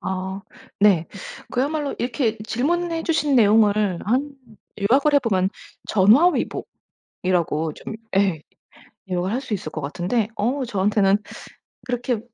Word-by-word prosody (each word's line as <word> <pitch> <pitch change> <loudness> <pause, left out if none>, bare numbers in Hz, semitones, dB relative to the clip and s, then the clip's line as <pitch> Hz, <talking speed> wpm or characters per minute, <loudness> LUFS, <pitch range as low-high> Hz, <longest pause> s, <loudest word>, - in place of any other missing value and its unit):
아 190 +1 -4 0.4
네. 190 -6 +4 0.4
그야말로 285 +3 -1
이렇게 240 -2 -1
질문해 325 +10 -1
주신 300 -4 +1
내용을 210 -4 +4
한 265 +6 0 0.5
요약을 275 +9 +3
해보면 200 -9 +2 1.8
전화위복이라고 160 -3 0
좀 - - -8 0.2
예. 190 -6 +2 0.7
요약을 180 +1 -1
할 250 +4 -1
수 250 -5 -5
있을 175 -6 -4
것 155 - -5
같은데 180 - -1
어 255 +6 -1
저한테는 200 -2 +2 0.7
그렇게 245 -1 -1
215 Hz, 255 characters per minute, -22 LUFS, 190-260 Hz, 1.8 s, 네